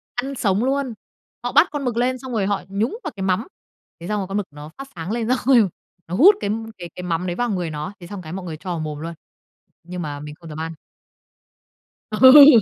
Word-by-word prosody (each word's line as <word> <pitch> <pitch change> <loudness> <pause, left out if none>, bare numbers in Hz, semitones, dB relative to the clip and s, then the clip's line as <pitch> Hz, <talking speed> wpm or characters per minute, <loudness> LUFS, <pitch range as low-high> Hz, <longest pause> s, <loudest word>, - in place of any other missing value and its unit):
Ăn 270 +3 -2
sống 200 -2 +1
luôn, 270 -2 0 0.5
họ 245 - -1
bắt 300 +6 +6
con 290 -2 -3
mực 235 -2 -1
lên 255 +1 +1
xong 260 +1 -8
rồi 215 -5 +1
họ 205 0 0
nhúng 215 - -1
vào - - -3
cái 195 - -4
mắm, 190 +5 +1 0.5
thế 170 - -7
xong 210 +1 0
rồi 190 - -3
con 195 +2 -2
mực 205 -2 -2
nó 150 +1 -10
phát 275 - -7
sáng 165 +3 -5
lên 230 -1 -1
xong 255 - +3
rồi 240 -6 +6 0.4
nó 175 - -3
hút 375 - +8
cái - - -2 0.3
cái 175 -2 -7
cái 180 - -6
mắm 180 0 -1
đấy 175 - -2
vào 245 +3 0
người 180 -5 -1
nó, 155 +5 -5
thế 175 - -10
xong 200 0 -7
cái 160 -1 -8
mọi 190 -1 -5
người 160 -3 -5
cho 185 +4 -8
vào 170 -2 -2
mồm 155 -1 -4
luôn, 165 +2 -5 0.7
nhưng 180 +1 -6
mà 145 -2 -5
mình 150 0 -8
không 165 +2 -13
dám 155 0 -7
ăn. 165 0 -3 1.4
Ừ. 260 +3 +9
195 Hz, 245 wpm, -22 LUFS, 170-245 Hz, 1.4 s, Ừ